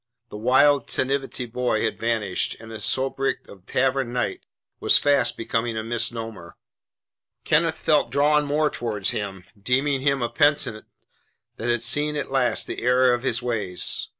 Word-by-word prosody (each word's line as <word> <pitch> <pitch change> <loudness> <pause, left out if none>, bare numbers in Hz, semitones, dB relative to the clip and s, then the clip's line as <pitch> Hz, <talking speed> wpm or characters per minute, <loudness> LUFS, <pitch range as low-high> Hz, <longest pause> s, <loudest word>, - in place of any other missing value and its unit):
The - - -10
wild 130 +4 +3
tantivy 135 -1 -2
boy 125 -3 0
had 110 - -2
vanished, 110 -5 0
and 115 0 -11
the 110 - -7
sobriquet 135 +3 -1
of 95 -1 -15
"Tavern 135 -2 0
Knight" 120 -5 -2 0.4
was - - +5
fast 140 -4 +2
becoming 115 0 -2
a 110 - -2
misnomer. 115 -5 -4 0.9
Kenneth 160 +1 +2
felt 150 -2 +2
drawn 150 +1 +3
more 150 +1 +1
towards 105 -4 -2
him, 95 -3 -5 0.2
deeming 135 +5 +1
him 140 -2 +1
a 120 - -1
penitent 145 -7 +1 0.7
that 120 - -3
had 120 -1 +1
seen 145 +5 +1
at 145 - -4
last 130 -2 +1
the - - -5
error 125 +1 +4
of 120 - -1
his 120 -2 -1
ways. 105 -7 -1
125 Hz, 155 wpm, -23 LUFS, 115-140 Hz, 0.9 s, was